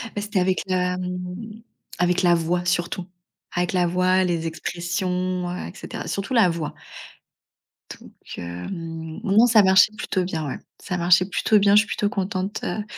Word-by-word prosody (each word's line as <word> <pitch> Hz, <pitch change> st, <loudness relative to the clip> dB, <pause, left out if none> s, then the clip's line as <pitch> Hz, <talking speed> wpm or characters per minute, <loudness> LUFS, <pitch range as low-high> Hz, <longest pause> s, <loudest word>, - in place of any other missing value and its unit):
Beh, 205 Hz, -, -2 dB
c'était 205 Hz, -1 st, -1 dB
avec 185 Hz, 0 st, +1 dB
la, 180 Hz, -1 st, 0 dB
mmh. 180 Hz, +4 st, -6 dB, 0.4 s
Avec 180 Hz, 0 st, +2 dB
la 175 Hz, -1 st, +5 dB
voix, 175 Hz, +2 st, -1 dB
surtout. 175 Hz, +1 st, -1 dB, 0.5 s
Avec 175 Hz, +1 st, 0 dB
la 180 Hz, -1 st, +2 dB
voix, 185 Hz, +1 st, +2 dB
les 170 Hz, -2 st, -1 dB
expressions, 180 Hz, +2 st, -2 dB
heu, 180 Hz, -, -5 dB
et -, -, -10 dB
cetera, -, -, -7 dB
surtout 200 Hz, +6 st, -3 dB
la 225 Hz, -7 st, +5 dB
voix. 165 Hz, -3 st, -3 dB, 1.3 s
Donc -, -, -14 dB, 0.3 s
hem, 160 Hz, -, -6 dB
non, 215 Hz, +5 st, +5 dB
ça 220 Hz, -3 st, +6 dB
marchait 190 Hz, +2 st, +5 dB
plutôt 185 Hz, -3 st, -1 dB
bien, 160 Hz, -4 st, -3 dB
ouais, 135 Hz, -, -5 dB, 0.2 s
ça 180 Hz, -2 st, -3 dB
marchait 180 Hz, +1 st, +4 dB
plutôt 205 Hz, +3 st, +2 dB
bien. 200 Hz, 0 st, +4 dB
Je -, -, +9 dB
suis 210 Hz, -, 0 dB
plutôt 205 Hz, -, -1 dB
contente, 195 Hz, 0 st, -3 dB
heu, 215 Hz, -, -2 dB
180 Hz, 170 wpm, -23 LUFS, 175-195 Hz, 1.3 s, Je